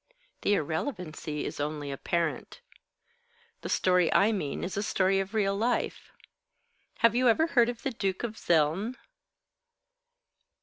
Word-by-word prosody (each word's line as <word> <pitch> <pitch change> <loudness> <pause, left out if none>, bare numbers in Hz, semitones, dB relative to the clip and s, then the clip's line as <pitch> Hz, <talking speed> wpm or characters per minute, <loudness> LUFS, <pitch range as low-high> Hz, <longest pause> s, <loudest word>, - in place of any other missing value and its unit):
"The 205 - +3
irrelevancy 160 - -3
is - - -5
only 145 -1 -3
apparent. 170 - -2 1.0
The - - -6
story 180 -2 +3
I 205 +3 +4
mean 170 -10 -3
is 180 - -4
a 200 - -1
story 195 -1 +1
of 195 +3 -4
real 200 -2 +2
life. 235 +4 -1 0.9
Have 230 - +5
you 250 +1 +4
ever 315 +8 +4
heard 245 -7 +3
of 240 -1 -6
the 270 - -1
Duke 195 -4 -2
of 235 -2 -2
Zeln?" 170 +8 +1
195 Hz, 135 wpm, -29 LUFS, 160-230 Hz, 1.0 s, Have